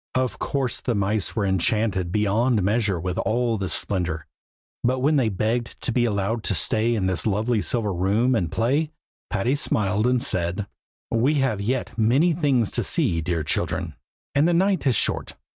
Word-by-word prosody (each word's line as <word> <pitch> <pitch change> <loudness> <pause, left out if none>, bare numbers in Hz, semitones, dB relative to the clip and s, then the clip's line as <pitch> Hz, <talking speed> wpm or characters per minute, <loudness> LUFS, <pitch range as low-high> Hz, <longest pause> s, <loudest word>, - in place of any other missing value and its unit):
Of 130 -1 -1
course 135 -4 -2
the 120 - -1
mice 100 0 0
were 105 -3 0
enchanted 95 -1 0
beyond 105 +2 +1
measure 105 -2 +1
with 90 +1 -3
all 115 -1 0
this 95 -2 -1
splendor; 85 -5 -2 0.6
but 125 +2 +2
when 145 +4 +2
they 130 -6 +2
begged 110 +4 -2
to - - -2
be 120 0 +2
allowed 105 +1 -1
to - - +1
stay 115 +2 +1
in 100 -4 -1
the 95 -4 0
lovely 110 +2 0
silver 110 -4 -1
room 100 +8 +1
and 85 -9 0
play, 140 +7 +1 0.4
Patty 115 +6 0
smiled 105 -5 0
and 125 0 +2
said, 90 -2 0 0.5
"we 125 +7 +2
have 130 -8 0
yet 125 +5 -2
many 135 +10 +3
things 140 - +1
to - - -1
see, 80 -1 +1
dear 80 0 -1
children, 75 - -2 0.4
and 145 +3 +3
the 175 - +2
night 190 -3 +2
is 125 - +3
short. - - 0
110 Hz, 175 wpm, -24 LUFS, 95-125 Hz, 0.6 s, many